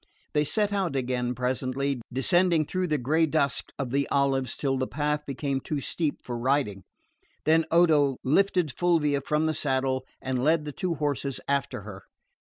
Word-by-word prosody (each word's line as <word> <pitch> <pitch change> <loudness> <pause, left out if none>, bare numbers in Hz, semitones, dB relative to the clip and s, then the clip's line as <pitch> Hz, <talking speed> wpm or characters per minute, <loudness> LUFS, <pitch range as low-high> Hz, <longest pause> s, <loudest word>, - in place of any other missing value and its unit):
They 150 - +3
set 205 +6 0
out 190 -7 0
again 125 -1 -1
presently, 130 +1 -1
descending 170 +5 +2
through 185 +4 -1
the 155 -2 +1
grey 155 +6 +2
dusk 140 -3 0
of 135 -4 -3
the 140 +1 0
olives 135 -3 +1
till 135 -2 0
the 130 0 -1
path 150 0 -2
became 140 0 -2
too 145 +2 -3
steep 150 +2 -2
for 120 -1 -4
riding; 130 -6 0 0.6
then 160 +1 +4
Odo 155 -6 +4
lifted 180 +2 +2
Fulvia 150 -4 +1
from 150 +3 0
the 160 - +1
saddle 130 -2 0 0.2
and 130 -1 -2
led 155 +1 +3
the 150 - -4
two 175 +3 -2
horses 140 -2 -2
after 140 -6 -1
her. 100 -2 -10
140 Hz, 170 wpm, -27 LUFS, 130-155 Hz, 0.6 s, then